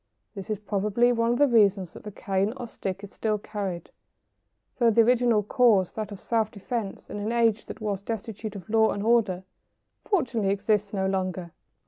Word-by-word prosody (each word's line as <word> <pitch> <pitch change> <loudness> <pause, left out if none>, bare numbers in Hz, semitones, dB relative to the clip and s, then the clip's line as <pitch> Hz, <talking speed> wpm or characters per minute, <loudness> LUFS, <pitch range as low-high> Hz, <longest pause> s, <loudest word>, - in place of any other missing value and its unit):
This 195 -1 -8
is 215 - -1
probably 210 +4 +1
one 230 -1 +1
of - - -1
the 290 - +5
reasons 200 -7 +3
that - - -11
the 210 - -7
cane 195 +1 -1
or 245 - -5
stick 195 -2 -5
is 200 - -10
still 215 -1 -1
carried, 200 -5 -5 0.9
though 235 -2 +5
the 230 +1 +5
original 240 -2 +3
cause, 210 -4 +3
that 215 -2 -5
of 200 - -8
self 225 -2 0
defence 215 -1 -5
in - - -6
an 210 +2 -2
age 230 -2 +2
that - - -8
was 205 -3 -2
destitute 220 0 -5
of 185 -4 -9
law 220 0 +4
and 200 - -4
order, 215 -5 +2 0.6
fortunately 240 - 0
exists 205 +1 +1
no 190 -2 -1
longer. 185 -2 -2
210 Hz, 185 wpm, -26 LUFS, 195-230 Hz, 0.9 s, the